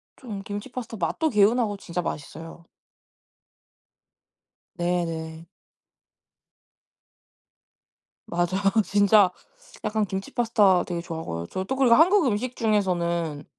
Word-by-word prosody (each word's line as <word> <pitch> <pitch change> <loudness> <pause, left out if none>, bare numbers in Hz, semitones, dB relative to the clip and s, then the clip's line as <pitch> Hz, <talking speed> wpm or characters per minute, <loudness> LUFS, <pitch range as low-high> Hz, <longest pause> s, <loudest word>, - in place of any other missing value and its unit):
좀 215 -7 -7
김치 205 +6 -6
파스타 235 -3 -6
맛도 320 +9 0
개운하고 210 0 +2
진짜 180 -2 -4
맛있어요. 165 +1 -7 2.1
네네. 165 -2 -3 2.8
맞아요. 175 0 0 0.4
진짜. 200 -1 +4 0.5
약간 215 0 0
김치 190 +1 -5
파스타 215 -6 +3
되게 175 -2 -4
좋아하고요. 160 - -5
저 185 - -4
또 265 +7 -3
그리고 255 -3 +5
한국 355 - +5
음식 245 +2 -2
중에서는 170 -8 0
195 Hz, 230 characters per minute, -25 LUFS, 170-225 Hz, 2.8 s, 그리고